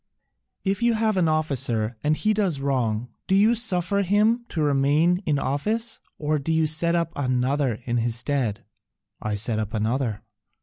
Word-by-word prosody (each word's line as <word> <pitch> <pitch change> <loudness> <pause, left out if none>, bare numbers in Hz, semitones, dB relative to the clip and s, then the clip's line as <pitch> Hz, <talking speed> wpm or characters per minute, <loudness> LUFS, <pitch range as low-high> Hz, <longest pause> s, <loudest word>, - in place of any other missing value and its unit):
"If 195 +2 -1
you 235 -1 +3
have 220 -1 +1
an 180 -3 +2
officer 125 -8 0
and 155 +1 +2
he 215 0 +1
does 195 -9 0
wrong, 125 -4 -1 0.2
do 190 - +2
you 210 +4 +5
suffer 200 -4 +1
him 210 +5 +2
to 160 - -1
remain 150 +5 +2
in 150 -2 +2
office, 215 - -1 0.2
or 150 0 0
do 140 +4 -3
you 160 0 +2
set 165 +2 +2
up 170 -1 0
another 130 -1 0
in 120 0 -1
his 115 0 0
stead?" 120 -4 -2 0.6
"I 105 -1 -2
set 110 +1 0
up 110 0 -3
another." 110 0 -1
150 Hz, 170 wpm, -24 LUFS, 125-190 Hz, 0.6 s, you